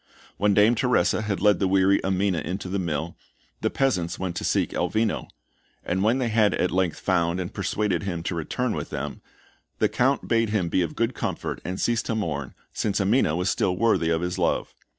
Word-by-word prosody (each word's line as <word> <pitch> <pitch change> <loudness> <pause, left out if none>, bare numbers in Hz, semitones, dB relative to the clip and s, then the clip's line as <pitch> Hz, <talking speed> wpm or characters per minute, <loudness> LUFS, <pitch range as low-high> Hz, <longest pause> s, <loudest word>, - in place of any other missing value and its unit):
When 100 0 +2
Dame 105 +4 +5
Teresa 125 -1 +2
had 105 -2 -2
led 105 -3 +4
the 95 - +2
weary 95 +1 +3
Amina 95 -2 +1
into 95 +5 -4
the 100 +1 -1
mill, 80 -1 -3 0.5
the - - +1
peasants 95 -12 0
went 90 -2 -3
to - - -3
seek - - +1
Elvino; 110 -1 0 0.6
and 95 +2 0
when 115 +4 +3
they 125 -3 0
had 110 -3 +3
at 90 - 0
length 90 -3 0
found 85 -1 +1
and 90 -1 -4
persuaded 100 -2 -1
him 85 -4 -4
to 90 - -2
return 110 +9 -2
with - - -4
them, 75 +1 -5 0.6
the - - +3
Count 135 +3 +1
bade 115 -2 +2
him 100 -5 0
be 90 - +2
of 85 - -2
good 115 +2 0
comfort - - -4
and 90 +1 -4
cease 120 -1 +1
to 115 - -3
mourn, 75 -10 -3 0.2
since 100 -2 -1
Amina 100 -5 +2
was 90 +1 0
still 90 -2 0
worthy 105 -6 +2
of 80 0 +1
his 90 0 -3
love. - - 0
95 Hz, 205 wpm, -25 LUFS, 85-110 Hz, 0.6 s, Dame